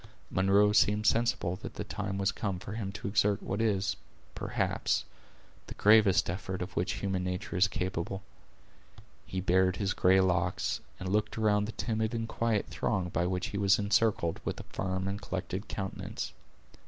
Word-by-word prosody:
Munro 100 +2 +4
seemed 105 0 +3
sensible 115 -7 +2
that - - -8
the - - -3
time 100 -1 -4
was 100 0 +1
come 100 -4 -3
for 95 - -8
him 105 -2 -3
to 105 - -5
exert 100 0 +2
what 100 +3 -2
is, 100 -4 +1 0.4
perhaps, - - -1 0.6
the - - -8
greatest 105 -2 +5
effort 90 +1 -3
of 90 - -9
which 90 - 0
human 95 -2 -2
nature 90 +1 -3
is 90 +2 +5
capable. 95 +1 -3 1.0
He 95 - -3
bared 95 0 +3
his 100 -1 -1
gray 95 +1 +4
locks, 90 -1 +1 0.2
and 95 - -5
looked 105 +3 0
around 105 -2 +3
the 110 - -4
timid 110 0 -1
and 115 -1 -2
quiet 115 -2 0
throng 95 -4 -1
by 85 0 0
which 90 0 -2
he 100 - -3
was 100 -1 +4
encircled, 100 -4 +1
with - - -3
a - - -7
firm 95 0 -3
and 100 +1 -3
collected 95 +1 -4
countenance. 95 -1 -5
100 Hz, 170 wpm, -30 LUFS, 95-105 Hz, 1.0 s, greatest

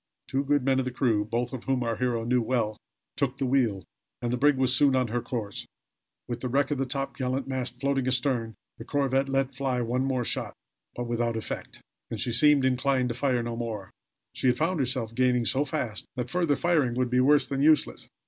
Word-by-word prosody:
Two 135 +1 0
good 145 -2 +1
men 135 -1 +3
of 130 - -1
the - - -1
crew, 120 -5 +1
both 120 +4 -2
of 130 - -6
whom 130 -2 0
our 115 -1 -1
hero 120 -3 0
knew 125 +1 +2
well, 115 -3 0 0.4
took 135 -2 -1
the 135 - -1
wheel, 120 -7 +1 0.4
and 120 0 -2
the - - 0
brig 145 +2 +4
was 130 -1 +3
soon 140 0 +4
on 130 -2 +1
her 120 +2 -1
course, 110 -4 -4 0.6
with 120 -1 -4
the 125 - -3
wreck 140 +3 +1
of 145 - -1
the 135 - 0
topgallant 135 0 -2
mast 125 -2 -2
floating 135 -1 0
astern. 125 -3 0 0.2
The - - -6
corvette 135 0 0
let 135 0 0
fly 130 -1 -1
one 120 +2 0
more 130 -2 0
shot, - - -2 0.4
but 120 - -3
without 120 -1 -1
effect, 110 - -6 0.3
and - - -5
she 120 - 0
seemed 140 +3 +5
inclined 130 0 +1
to - - -1
fire 125 -2 +1
no 120 0 -4
more. 110 -5 -5 0.4
She - - -1
had 125 0 +3
found 165 +3 0
herself 125 -4 0
gaining 125 -1 +2
so 135 +4 +2
fast 115 -5 -3
that 125 -1 -4
further 170 -4 +2
firing 150 -9 +1
would 125 -1 0
be 125 - +3
worse 145 +3 +4
than 135 +1 -2
useless. 155 +1 +2
130 Hz, 215 wpm, -27 LUFS, 120-135 Hz, 0.6 s, seemed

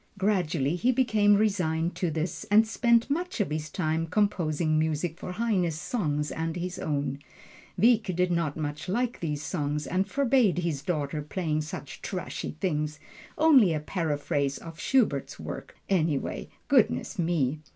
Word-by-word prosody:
Gradually 175 -7 +1
he 245 +8 +3
became 220 -5 +4
resigned 180 -5 +1
to 175 - 0
this, 160 +2 -3
and 215 +2 +5
spent 235 +1 +3
much 355 +1 -2
of 205 - 0
his 155 0 -3
time 160 -1 -1
composing 165 -6 +1
music 160 +1 -1
for 180 - -5
Heine's 180 -7 0
songs 150 -6 -1
and 160 0 -3
his 180 +1 -4
own. 145 -4 -2 0.6
Wieck 230 -1 +4
didn't 170 -4 +1
much 150 +2 -4
like 240 +5 -1
these 150 -3 -3
songs, 150 -3 -2
and 185 +2 0
forbade 255 -9 +3
his 170 -6 -1
daughter 150 -2 -2
playing 155 0 -2
such 150 -3 -7
trashy 185 -4 -5
things 150 -4 -1 0.4
only 265 - +6
a - - -1
paraphrase 145 -4 -1
of 165 -1 -10
Schubert's 220 - +1
work, - - -7
anyway, 160 -7 0 0.2
goodness - - +2
me! 155 -4 +1
170 Hz, 145 wpm, -28 LUFS, 150-205 Hz, 0.6 s, only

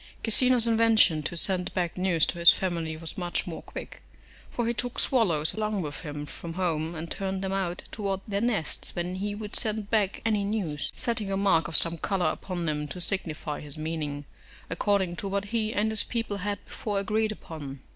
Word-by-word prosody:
Cecina's 245 +1 +7
invention 225 -8 +4
to 170 - -3
send 180 +1 +5
back 175 -3 -1
news 180 -4 +2
to 175 - -4
his 170 - +8
family 165 -4 -3
was 165 +3 -6
much 175 -1 -2
more 170 -2 -6
quick, - - -9 0.5
for 240 - -2
he 235 - 0
took 245 +1 -4
swallows 170 - +2
along 215 -3 -2
with 145 -2 -6
him 150 -2 -6
from 165 +3 -8
home, 165 -2 -1
and 165 +1 -7
turned 190 0 -3
them 190 - -2
out 185 -2 -2
towards 195 -3 -3
their 200 -1 -2
nests 215 -10 -2
when 175 +1 -3
he 205 +2 -3
would 210 0 -6
send 215 -2 -1
back 205 -4 +1
any 215 -3 +1
news; 180 -8 -2
setting 220 -4 0
a 195 - 0
mark 190 -6 +2
of 165 - +5
some 165 0 +6
colour 180 -3 0
upon 175 -1 -5
them 150 -1 -2
to 180 - -7
signify 160 -5 -2
his 145 0 -7
meaning, 155 -2 -4 0.5
according 190 0 0
to 200 - -4
what 200 +1 -2
he 220 -2 0
and 220 0 0
his 220 - +4
people 230 -4 -3
had 200 +1 -4
before 210 -2 -4
agreed 215 +2 0
upon. 145 -9 -8
190 Hz, 195 wpm, -27 LUFS, 165-210 Hz, 0.5 s, his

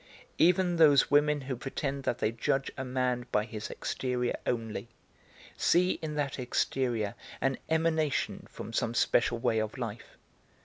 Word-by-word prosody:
Even 175 +1 +4
those 150 -4 +6
women 145 0 +4
who 130 0 -4
pretend 135 +2 -4
that 120 - 0
they 110 - 0
judge 135 +4 -1
a 130 - -4
man 125 -1 -1
by 105 0 +2
his 110 -2 -6
exterior 125 -2 -2
only, 115 -1 -2 0.7
see 180 +2 +3
in 155 -2 -4
that 145 -2 -2
exterior 120 -4 0 0.3
an 135 -1 0
emanation 160 -2 0
from 115 - -8
some 115 +1 0
special 120 0 +2
way 115 -1 +1
of 110 +3 -3
life. 115 -3 -6
130 Hz, 145 wpm, -30 LUFS, 115-150 Hz, 0.7 s, those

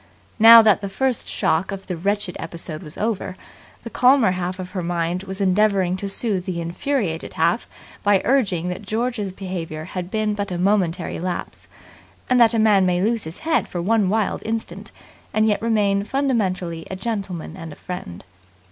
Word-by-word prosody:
Now 225 +1 +10
that 210 -2 +4
the 200 - -4
first 255 +4 -1
shock 165 +5 0
of 195 -1 -6
the 180 - -4
wretched 200 +1 -1
episode 165 -2 -5
was 155 -3 -9
over, 210 -4 -2 0.5
the 230 - -7
calmer 250 -5 +4
half 180 0 -3
of 185 -1 -7
her 185 - -3
mind 170 +1 -1
was 190 +1 -5
endeavouring 195 -1 +2
to 200 +1 -4
soothe 195 -3 -1
the 180 -2 -3
infuriated 170 - -2
half 170 +7 +1 0.3
by 205 -1 +4
urging 195 -10 +1
that 180 - -5
George's 215 0 -2
behaviour 175 -5 -5
had 180 +2 -6
been 215 0 0
but 205 -1 -3
a 180 - -3
momentary 180 -2 0
lapse, 180 +1 -5 0.6
and 250 - +5
that 235 -1 +5
a - - +2
man 215 -3 +4
may 180 -1 +2
lose 220 +2 0
his 160 +2 -7
head 325 0 +1
for 175 - -5
one 205 +2 +2
wild 215 0 0
instant, 225 0 -4 0.4
and 215 0 +3
yet 210 -2 +1
remain 205 -3 +1
fundamentally 195 -10 -1
a 190 - -4
gentleman 190 -5 -4
and 165 -4 -8
a - - -10
friend. 135 - -7
195 Hz, 180 wpm, -22 LUFS, 180-220 Hz, 0.6 s, Now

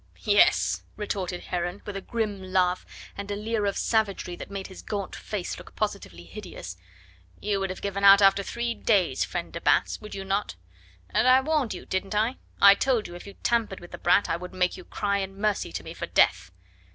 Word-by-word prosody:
"Yes!" 205 -1 +4
retorted 190 -4 -3
Heron 175 +2 -3
with 205 - -6
a 195 - -3
grim 210 -2 -2
laugh 185 -1 +1 0.3
and 200 0 -6
a 205 - -1
leer 210 0 -1
of 200 - -1
savagery 200 -5 0
that - - -9
made 195 -1 -5
his 190 - -10
gaunt 200 -3 -4
face 200 -4 -4
look - - -13
positively 200 - -3
hideous 85 +1 -8 0.6
"you 205 -1 -1
would 195 0 -1
have 185 - -7
given 200 0 -2
out 200 0 +9
after 195 0 +5
three 235 +4 -2
days, 205 -6 +2
friend - - -4
de - - -5
Batz, - - +2
would 210 - -8
you 195 0 -5
not? 195 - -1 0.6
And - - +3
I 255 +1 +7
warned 295 -4 0
you, - - -9
didn't 195 +2 -2
I? 225 +5 +1 0.2
I 200 0 +9
told 240 +1 +1
you 175 - -10
if 175 +3 -10
you 200 - -10
tampered 230 -5 +1
with 175 - -13
the - - -8
brat 180 +3 +4
I 165 - 0
would 180 +2 -9
make 180 -1 +1
you 180 - -11
cry 200 -1 -1
in 195 0 -5
mercy 210 - 0
to - - -5
me - - -8
for - - -5
death." - - +3
200 Hz, 210 wpm, -26 LUFS, 185-210 Hz, 0.6 s, out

